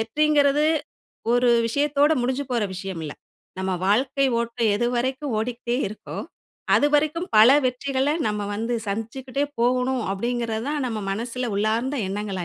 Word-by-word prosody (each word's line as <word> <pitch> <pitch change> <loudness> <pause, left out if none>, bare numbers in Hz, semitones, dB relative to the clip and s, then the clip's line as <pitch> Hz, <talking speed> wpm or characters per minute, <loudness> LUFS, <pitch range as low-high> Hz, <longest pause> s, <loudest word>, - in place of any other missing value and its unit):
வெற்றிங்கிறது 290 +4 +3 0.7
ஒரு 245 0 +4 0.2
விஷயத்தோட 290 +4 +2
முடிஞ்சு 260 +3 -1
போற 240 -3 +1
விஷயம் 185 -2 -5
இல்ல. 150 - -5 0.5
"நம்ம 190 0 -1
வாழ்க்கை 265 +7 +2
ஓட்டம் 230 -1 0
எது 240 - 0
வரைக்கும் 260 +1 -1
ஓடிகிட்டே 240 +1 -2
இருக்கோ, 215 - -9 0.6
அதுவரைக்கும் 300 +4 +2
பல 220 +3 +8 0.2
வெற்றிகள 265 +2 0 0.2
நம்ம 210 -1 -2
வந்து 230 +3 -2
சந்திச்சுக்கிட்டே 255 +7 -3 0.2
போகணும்." 250 +1 +1
அப்படிங்கிறது 230 +1 -2
தான் 295 -2 -1
நம்ம 225 -3 -3
மனசில் 235 +2 -3
உள்ளார்ந்த 225 +7 0
எண்ணங்களா 195 -2 -3
245 Hz, 130 wpm, -24 LUFS, 220-275 Hz, 0.7 s, பல